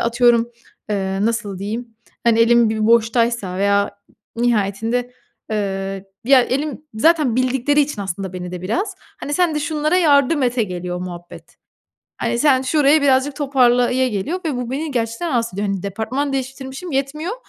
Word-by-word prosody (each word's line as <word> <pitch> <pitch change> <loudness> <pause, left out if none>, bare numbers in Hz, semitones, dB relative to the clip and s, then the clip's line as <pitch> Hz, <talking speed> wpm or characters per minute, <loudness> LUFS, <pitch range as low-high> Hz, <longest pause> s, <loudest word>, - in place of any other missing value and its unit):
atıyorum, 235 0 +3 0.4
eee, 195 -1 -1
nasıl 220 -4 -2
diyeyim, 225 +4 -5 0.3
hani, 230 -1 +4
elim 235 0 +5
bir 220 -1 0
boştaysa 230 -4 +2
veya 200 0 +2 0.5
nihayetinde, 235 +2 0 0.4
ııı, 195 -2 -3 0.2
ya, 265 0 +6
elim 290 +4 -2
zaten 290 0 +3
bildikleri 260 +3 +2
için 275 -8 -1
aslında 190 0 -5
beni 180 -1 -6
de 180 0 -6
biraz, 350 - -2 0.3
hani, 290 - -3
"Sen 355 -3 +2
de 300 - -1
şunlara 305 +3 0
yardım 290 -3 +3
et,"e 245 -1 +1
geliyor 180 -2 -4
muhabbet. 175 -2 -9 0.6
Hani, 235 - -1
"Sen 265 -3 +4
şurayı 290 +2 +3
birazcık 275 0 +2
toparla," 250 -4 +3
ya 260 +1 +2
geliyor 250 - -2
ve 295 -5 -1
bu, 245 0 -4
beni 300 +3 -3
gerçekten 235 +6 -2
rahatsız 235 -6 -1
ediyor. 200 +2 -2
Hani, 195 -1 -3
departman 250 +8 -2
değiştirmişim 265 +5 -5
yetmiyor, 295 +8 -2
240 Hz, 155 wpm, -20 LUFS, 205-280 Hz, 0.6 s, ya